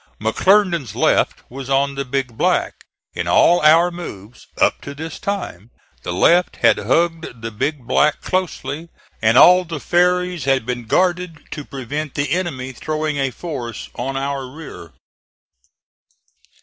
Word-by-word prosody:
McClernand's 170 - +2
left - - +1
was 135 +1 -8
on 140 +1 +2
the 140 0 -3
Big 130 -2 -3
Black. - - 0 0.3
In - - -3
all 175 +1 +5
our 165 +3 +5
moves, 115 - -10
up - - +2
to 140 - -8
this 160 +3 -7
time, 180 - -4 0.3
the 90 - -5
left 175 - +3
had - - +3
hugged 160 +1 -1
the 115 - -4
Big 130 +5 -3
Black 150 +4 +2
closely, 165 -4 -3 0.3
and 110 +2 +4
all 180 +4 +8
the 165 -3 -6
ferries 180 -1 +1
had 135 -3 +1
been 125 -1 -4
guarded 175 - 0
to 150 - -5
prevent 140 +2 -5
the 145 -1 -1
enemy 150 -7 -2
throwing 155 +3 -3
a 135 -1 0
force 125 -5 -6
on 135 +2 -4
our 135 -1 -3
rear. 130 - -11
140 Hz, 145 wpm, -19 LUFS, 125-170 Hz, 0.3 s, all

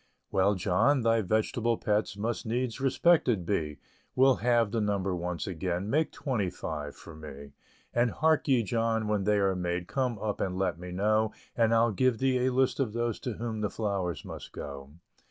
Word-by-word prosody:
"Well, 100 +2 +3
John, 105 +9 +2
thy 115 0 +3
vegetable 110 +3 0
pets 105 -1 0
Must 115 +3 -2
needs 125 +2 -2
respected 135 - +3
be; 75 -6 -1 0.4
We'll 130 0 +5
halve 120 -3 +2
the 115 -1 0
number 100 -3 0
once 90 -1 -3
again 90 +2 -3
Make 155 +2 +2
twenty 110 -9 -1
five 75 -4 -5
for 80 - -12
me. 70 -2 -10 0.4
And 120 0 +3
hark 160 +5 +2
ye, 130 -4 +3
John, 115 0 0
when 105 -2 0
they 105 0 +3
are 95 -1 +2
made 90 -1 -2
Come 130 -4 -1
up 105 0 -3
and 90 -1 -1
let 90 -3 -1
me 90 0 -7
know; 110 +4 +1 0.2
And 115 -1 +3
I'll 115 0 +4
give 125 +3 +2
thee 130 0 +2
a - - +2
list 130 +2 +1
of 125 -6 0
those 120 -1 -1
To 125 - -4
whom 110 0 -4
the 105 - 0
flowers 95 - -2
must - - -9
go." 70 -1 -7
110 Hz, 190 wpm, -29 LUFS, 90-120 Hz, 0.4 s, We'll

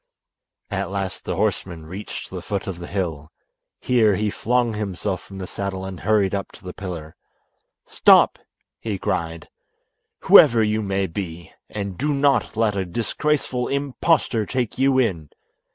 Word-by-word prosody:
At - - -2
last 95 -1 -4
the - - -2
horseman 85 -4 -2
reached 95 +6 -7
the 90 -1 -5
foot 100 +2 -3
of 95 -4 -5
the 85 - -7
hill. 80 -6 -3 0.5
Here 110 -5 +3
he 105 +1 0
flung 120 +1 +1
himself 100 -2 -3
from 95 - -12
the 95 - -5
saddle 95 0 -4
and 95 -2 -7
hurried 105 -3 +2
up 100 -1 -3
to - - -15
the 90 -1 -7
pillar. 85 -5 -7 0.7
"Stop!" - - +5 0.4
he 105 -3 -3
cried, 85 -2 -3 0.7
"whoever 115 -1 +7
you 110 0 +1
may 100 -1 0
be, 85 -2 -6 0.2
and 100 -3 -5
do 145 +1 +1
not 140 -5 +2
let 110 -2 +2
a 95 - 0
disgraceful 125 - -1
impostor 140 - +1
take 125 -2 -2
you 135 0 +3
in. 90 - 0
100 Hz, 150 wpm, -22 LUFS, 90-115 Hz, 0.7 s, whoever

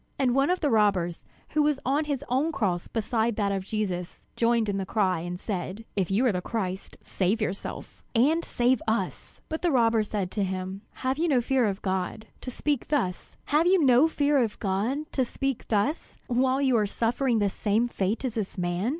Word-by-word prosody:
And 260 -3 +2
one 275 +3 +3
of 365 0 +1
the 295 -4 +1
robbers, 195 -6 +2 0.3
who 305 - +1
was 295 -2 +2
on 285 +4 +1
his 285 -3 -3
own 270 +6 +1
cross 185 - -1
beside 225 0 0
that 205 -2 0
of 195 -1 -1
Jesus, 190 -4 -3
joined 230 -1 +2
in 200 -1 -1
the 195 - -1
cry, 190 -5 +1
and 175 +2 -5
said: 195 +2 -4
"If 190 -4 0
you 210 +7 +2
are 245 - +4
the 180 -2 -2
Christ, 190 -3 -4
save 195 +4 0
yourself 200 -3 -4
and 305 +8 +3
save 245 -1 +1
us!" 215 -4 -2
But 315 0 -4
the 355 - +1
other 310 - +2
robber 230 -2 +4
said 205 -3 -3
to 205 - -1
him: 190 +1 -4 0.2
"Have 260 +3 +1
you 340 - +2
no 275 -6 +3
fear 255 0 +2
of 200 -2 -2
God, 190 +3 -2 0.2
to - - -5
speak 285 +2 -2
thus, 210 -12 -2
while 300 +3 +3
you 360 -7 +4 2.9
are 210 -2 +2
suffering 235 +3 0
the 205 -2 +2
same 215 +4 +1
fate 205 0 -1
with 255 -4 -2
this 215 -4 -4
man? 175 +4 -1
220 Hz, 180 wpm, -27 LUFS, 190-260 Hz, 2.9 s, are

